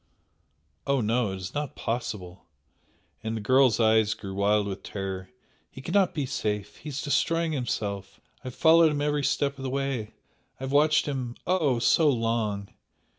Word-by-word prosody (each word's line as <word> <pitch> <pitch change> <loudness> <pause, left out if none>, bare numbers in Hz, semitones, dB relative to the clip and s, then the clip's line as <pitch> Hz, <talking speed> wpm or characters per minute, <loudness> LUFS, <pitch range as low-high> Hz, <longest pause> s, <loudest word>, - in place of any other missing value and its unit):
"Oh, 140 -1 +2
no, 115 -1 +1
it - - -4
is 95 -1 -7
not 145 -1 -3
possible!" 105 -6 -4 0.8
and 110 0 -2
the - - -3
girl's 130 +1 +4
eyes 110 -1 +3
grew 95 -2 -7
wild 100 +1 +2
with 100 -1 -5
terror 95 -2 -5 0.4
"He - - -12
cannot 180 +7 +1
be 145 -3 -1
safe! 105 -5 -3
he 155 - -8
is 140 0 -4
destroying 165 +3 +1
himself! 100 -8 -3 0.2
I - - -25
have 125 - -7
followed 165 0 +6
him 145 -1 -2
every 150 -1 0
step 140 0 0
of - - -6
the 130 - -2
way 135 -5 -3 0.4
I - - -16
have 135 - -3
watched 150 +1 +4
him, 130 -4 -3
oh! 160 -9 +2
so 150 +6 +4
long! 115 -5 -1
125 Hz, 175 wpm, -27 LUFS, 105-145 Hz, 0.8 s, followed